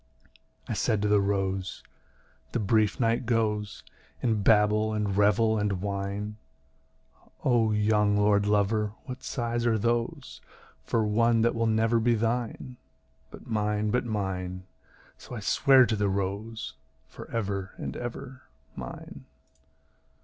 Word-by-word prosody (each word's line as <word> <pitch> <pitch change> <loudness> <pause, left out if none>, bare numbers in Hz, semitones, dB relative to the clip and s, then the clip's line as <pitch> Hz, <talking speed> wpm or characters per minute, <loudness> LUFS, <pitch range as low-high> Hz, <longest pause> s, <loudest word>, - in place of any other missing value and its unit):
I - - -2
said 105 -2 0
to - - +2
the 105 -1 +4
rose, 95 -1 -2 0.7
"The - - 0
brief 105 0 +2
night 115 0 +1
goes 105 -3 -1 0.4
In 110 -4 +1
babble 105 +1 +3
and 105 -2 -1
revel 105 +2 +3
and 105 -1 0
wine. 100 +2 -4 1.1
O 115 -4 +3
young 105 -1 +2
lordlover, 105 +1 +2
what 130 0 -8
sighs 120 -1 -2
are 115 -1 +3
those 115 +2 -2 0.4
For 115 -2 0
one 115 +2 +3
that 120 +1 +3
will 115 0 0
never 110 +1 +2
be 120 +1 +2
thine? 120 +2 -2 0.5
But - - -13
mine, 105 -1 0
but 125 - +1
mine," 95 -5 -3 0.6
so - - -9
I - - -4
sware 130 +5 +5
to 110 - -1
the 100 -1 0
rose, 100 +4 -3 0.3
"For - - -11
ever 100 -3 -3
and - - -5
ever, 125 +2 -7 0.3
mine." - - -9
105 Hz, 130 wpm, -27 LUFS, 100-115 Hz, 1.1 s, sware